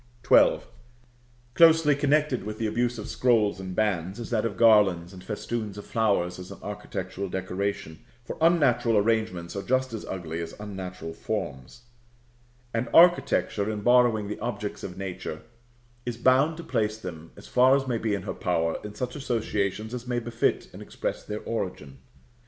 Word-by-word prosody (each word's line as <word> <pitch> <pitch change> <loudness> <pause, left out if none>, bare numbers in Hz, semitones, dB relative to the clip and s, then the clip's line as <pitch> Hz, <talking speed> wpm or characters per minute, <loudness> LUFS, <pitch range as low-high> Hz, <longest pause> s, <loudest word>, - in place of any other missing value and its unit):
XII. - - +6 0.9
Closely 160 -1 +6
connected 145 -4 +1
with 105 +1 -5
the 115 - -2
abuse 120 +2 0
of 105 - -6
scrolls 110 -6 +2
and 95 -1 -6
bands, 95 -2 -1
is 120 - -7
that 115 -1 +1
of 100 -5 -3
garlands 100 -6 +4
and 90 -1 -11
festoons 110 -1 -4
of 105 - -8
flowers 100 -6 0
as 90 - -9
an - - -9
architectural 100 0 -5
decoration, 95 -3 -3 0.3
for - - -5
unnatural 125 -9 +3
arrangements 105 -5 0
are 100 - -2
just 130 +2 0
as 110 - -5
ugly 85 -3 -4
as 85 - -7
unnatural 95 -5 -6
forms; 65 - -5 0.9
and 115 +1 -1
architecture, 140 - +4
in 105 -1 -3
borrowing 120 -2 +4
the 105 - -5
objects 105 -3 -4
of 90 - -7
nature, 95 -5 -6 0.6
is 120 -2 -4
bound 135 +6 +3
to 170 - -7
place 110 -6 -1
them, 85 -5 -8
as - - -12
far 130 +2 +5
as 135 -1 -1
may 120 -3 0
be 110 -2 0
in 100 - -5
her 100 - -4
power, 85 -2 0
in 105 0 -8
such 125 +3 -4
associations 110 -5 -2
as 125 0 -6
may 125 -1 -1
befit 120 -1 0
and - - -10
express - - -4
their 105 0 -5
origin. 90 - -5
110 Hz, 170 wpm, -26 LUFS, 95-120 Hz, 0.9 s, XII